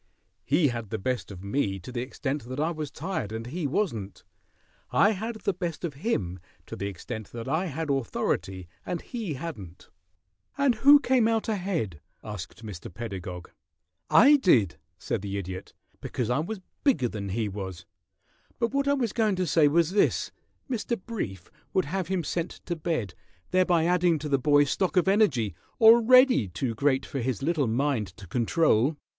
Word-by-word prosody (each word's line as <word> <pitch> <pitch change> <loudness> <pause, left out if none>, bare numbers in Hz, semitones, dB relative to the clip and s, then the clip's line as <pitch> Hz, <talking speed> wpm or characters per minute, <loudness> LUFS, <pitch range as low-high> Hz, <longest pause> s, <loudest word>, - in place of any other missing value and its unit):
He 150 +1 +3
had 115 -4 -5
the - - -2
best 125 +2 -2
of 95 -2 -9
me 100 -2 -1
to 95 +7 -9
the 120 -1 -3
extent 135 +1 -4
that 130 +3 -6
I 160 +3 +1
was 155 -3 -4
tired 150 - -4
and 110 +1 -5
he 150 +5 -3
wasn't. 115 - -2 0.7
I 205 - +4
had 220 +3 -4
the 200 - 0
best 175 -3 -4
of 160 - -4
him 105 - -2 0.3
to - - -7
the 100 - -3
extent 100 +2 -7
that 115 0 -6
I 160 +7 0
had 160 -1 -3
authority 95 -8 -2 0.2
and 175 - -3
he 220 - -5
hadn't 125 - -8 0.3
" 95 - -42
"And 280 -3 +3
who 280 +6 +7
came 255 -4 +3
out 225 -1 0
ahead?" 175 - -2 0.2
asked 105 +2 -8
Mr. 95 -5 -8
Pedagog. 95 -6 -7 0.6
"I 290 +5 +7
did," 110 - +3 0.2
said 105 - -3
the 100 0 -4
Idiot, 95 -1 -6 0.3
"because 125 -2 -2
I 125 - +2
was 190 +5 -4 0.2
bigger 255 - +3
than 105 -3 -5
he 110 +3 -1
was; 95 -3 -6 0.7
but 235 +1 -1
what 280 0 +1
I 280 - +4
was 240 -6 -1
going 215 -4 +2
to 185 0 0
say 155 -1 +4
was 165 +3 +3
this: 205 - +2 0.4
Mr. 235 -2 -2
Brief 110 - -6 0.2
would 185 - +2
have 180 +3 -2 0.2
sent 170 +3 -2
him - - -15
to 175 - -2
bed, 155 - -2 0.4
thereby 180 -3 +3
adding 175 -1 +3
to 150 0 -5
the 140 -1 +2
boy's 145 +1 +4
stock 190 0 0
of 180 - +4
energy, 155 - +3 0.3
already 235 - +7
too 115 +7 -3
great 135 +3 +1
for 135 - -4
his 130 -1 -2
little 155 -4 +1
mind 120 -2 0
to 100 - -10
control." 130 - +2
145 Hz, 180 wpm, -27 LUFS, -, 0.7 s, who